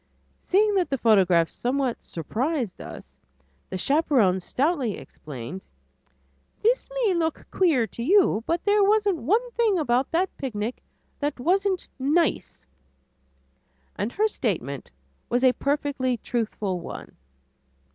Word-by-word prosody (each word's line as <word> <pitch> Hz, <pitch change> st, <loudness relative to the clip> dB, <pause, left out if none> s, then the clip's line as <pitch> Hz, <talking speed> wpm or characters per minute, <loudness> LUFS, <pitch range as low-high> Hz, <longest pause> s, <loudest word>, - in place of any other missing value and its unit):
Seeing 415 Hz, +3 st, +3 dB
that 375 Hz, -3 st, +1 dB
the 270 Hz, -, 0 dB
photograph 190 Hz, -8 st, +4 dB
somewhat 255 Hz, +3 st, -2 dB
surprised 235 Hz, -, -3 dB
us, -, -, -10 dB, 0.6 s
the -, -, -3 dB
chaperon 255 Hz, -, +3 dB
stoutly 265 Hz, -, 0 dB
explained, 145 Hz, +5 st, -9 dB, 1.0 s
"This 485 Hz, +4 st, +2 dB, 0.2 s
may 400 Hz, -, +3 dB
look 325 Hz, -2 st, -1 dB
queer 315 Hz, -11 st, +3 dB
to 235 Hz, -, -8 dB
you, 340 Hz, -, +3 dB
but 335 Hz, +1 st, 0 dB
there 410 Hz, 0 st, +4 dB
wasn't 410 Hz, -2 st, +3 dB
one 440 Hz, -, +1 dB
thing 450 Hz, -5 st, +2 dB
about 255 Hz, -4 st, +1 dB
that 360 Hz, +3 st, 0 dB
picnic 230 Hz, -3 st, -3 dB, 0.4 s
that 290 Hz, -2 st, -2 dB
wasn't 380 Hz, +6 st, +1 dB
nice," 305 Hz, +5 st, 0 dB, 1.3 s
and 205 Hz, +4 st, -2 dB
her 430 Hz, +2 st, +2 dB
statement 155 Hz, -, -3 dB, 0.4 s
was 245 Hz, +2 st, +1 dB
a 255 Hz, -1 st, +6 dB
perfectly 275 Hz, -3 st, -1 dB
truthful 215 Hz, -5 st, -2 dB
one. 170 Hz, -, -9 dB
275 Hz, 120 wpm, -25 LUFS, 220-360 Hz, 1.3 s, a